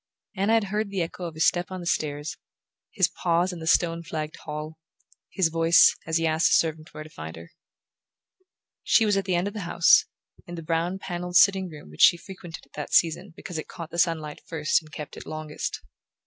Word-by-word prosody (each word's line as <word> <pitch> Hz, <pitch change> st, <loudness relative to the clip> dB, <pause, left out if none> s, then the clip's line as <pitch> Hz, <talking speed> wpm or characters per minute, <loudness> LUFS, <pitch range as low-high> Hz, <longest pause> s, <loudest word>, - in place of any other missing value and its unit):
Anna 200 Hz, +3 st, +1 dB
had 225 Hz, -1 st, +4 dB
heard 210 Hz, +1 st, -2 dB
the 195 Hz, -3 st, -1 dB
echo 175 Hz, +2 st, -6 dB
of 165 Hz, -2 st, -6 dB
his 160 Hz, -, +2 dB
step 175 Hz, 0 st, +1 dB
on 185 Hz, -1 st, -6 dB
the 175 Hz, -, -8 dB
stairs, 150 Hz, -2 st, -2 dB, 0.6 s
his -, -, +3 dB
pause 175 Hz, +1 st, 0 dB
in 175 Hz, -, -7 dB
the 160 Hz, -, -7 dB
stone 165 Hz, 0 st, +2 dB
flagged 155 Hz, -1 st, -5 dB
hall, 155 Hz, +1 st, -6 dB, 0.5 s
his 185 Hz, -4 st, +1 dB
voice 165 Hz, +1 st, +5 dB
as 160 Hz, 0 st, +1 dB
he 165 Hz, -, 0 dB
asked 160 Hz, 0 st, +3 dB
a -, -, +5 dB
servant 160 Hz, -1 st, 0 dB
where 155 Hz, -, -8 dB
to 155 Hz, -, -13 dB
find 80 Hz, -, -8 dB
her. 85 Hz, +1 st, -12 dB, 1.3 s
She 225 Hz, -, +4 dB
was 205 Hz, -1 st, +2 dB
at 195 Hz, -1 st, 0 dB
the 185 Hz, -2 st, 0 dB
end 175 Hz, +3 st, 0 dB
of 205 Hz, -, -5 dB
the 215 Hz, -, -5 dB
house, 165 Hz, -5 st, +4 dB, 0.4 s
in 175 Hz, -, -7 dB
the 165 Hz, -, -7 dB
brown 165 Hz, +3 st, -1 dB
panelled 180 Hz, -1 st, -5 dB
sitting 190 Hz, +1 st, +5 dB
room 150 Hz, -, -12 dB
which 75 Hz, -, -6 dB
she 175 Hz, -, +7 dB
frequented 175 Hz, -3 st, -10 dB
at 140 Hz, -, -34 dB
that 150 Hz, -, -6 dB
season 170 Hz, +3 st, +2 dB
because 180 Hz, -4 st, -6 dB
it -, -, -7 dB
caught 165 Hz, -2 st, -9 dB
the 170 Hz, -, -4 dB
sunlight 160 Hz, -3 st, 0 dB
first 160 Hz, 0 st, +1 dB
and 155 Hz, -1 st, -18 dB
kept 150 Hz, -1 st, -8 dB
it -, -, -10 dB
longest. 155 Hz, -1 st, -5 dB
165 Hz, 220 wpm, -26 LUFS, 155-180 Hz, 1.3 s, she